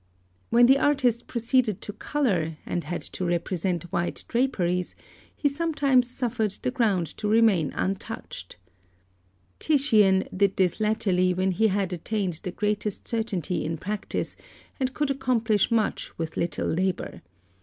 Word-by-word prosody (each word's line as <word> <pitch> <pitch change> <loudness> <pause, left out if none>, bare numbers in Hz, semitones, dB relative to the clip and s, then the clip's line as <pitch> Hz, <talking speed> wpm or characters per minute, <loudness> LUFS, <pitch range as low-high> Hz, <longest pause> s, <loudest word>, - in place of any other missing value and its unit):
When 240 +1 +6
the 270 +2 +5
artist 255 -5 +2
proceeded 235 -3 +1
to 205 - -6
colour, 190 - -1
and 175 - -3
had 175 - -4
to - - -5
represent 175 0 -1
white 170 -1 -1
draperies, 180 -8 0 0.4
he 290 - +1
sometimes 280 -4 +2
suffered 235 -5 -1
the 255 - 0
ground 215 -9 +1
to 210 - -2
remain 210 -9 +3
untouched. 190 - -4 1.0
Titian 215 -11 +4
did 195 0 +2
this 185 +1 +2
latterly 190 -4 +2
when 190 +1 +1
he 220 +5 +3
had 195 -2 0
attained 190 +1 -1
the 180 - -4
greatest 210 +1 -2
certainty 205 -7 -1
in 160 +1 -3
practice, 205 +5 -4 0.4
and 260 -1 0
could 295 -2 0
accomplish 235 -6 +1
much 225 -2 -1
with 165 -1 -4
little 170 - -1
labour. 185 +2 -2
210 Hz, 135 wpm, -26 LUFS, 180-245 Hz, 1.0 s, When